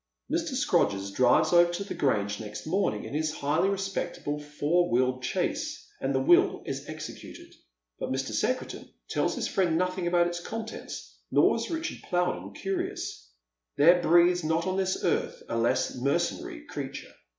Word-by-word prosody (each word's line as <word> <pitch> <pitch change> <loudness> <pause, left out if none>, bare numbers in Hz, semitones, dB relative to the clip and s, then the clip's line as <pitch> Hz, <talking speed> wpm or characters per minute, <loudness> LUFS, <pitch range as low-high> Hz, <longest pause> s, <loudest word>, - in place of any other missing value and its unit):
Mr. - - -1
Scrodgers 100 -1 +1
drives 125 - +4
over 175 0 +6
to 200 - -2
the 200 - -6
Grange 105 -6 0
next 105 -1 -7
morning 160 - 0
in - - -7
his 155 +1 0
highly 155 +7 +1
respectable 190 -6 -3
four 150 +4 0
wheeled 130 +1 +1
chaise, - - -2 0.2
and 135 - 0
the - - +3
will 155 +6 +4
is 135 +2 -5
executed, 155 0 -9 0.5
but - - -3
Mr. 135 0 -2
Secretan 255 0 -2 0.2
tells - - +1
his - - -1
fiiend 180 -4 +1
nothing 180 +1 0
about 175 0 +4
its 175 0 -2
contents, 225 +5 -7
nor - - +4
is - - -3
Richard 330 0 -3
Plowden 175 - -1
curious. 190 - -4 0.5
There 175 +4 +6
breathes 175 +1 +4
not 160 +2 +1
on 185 0 -1
this 190 -1 -1
earth - - 0
a - - -3
less 115 0 +1
mercenary 235 - -1
creature. 140 - -6
165 Hz, 160 wpm, -28 LUFS, 135-185 Hz, 0.5 s, over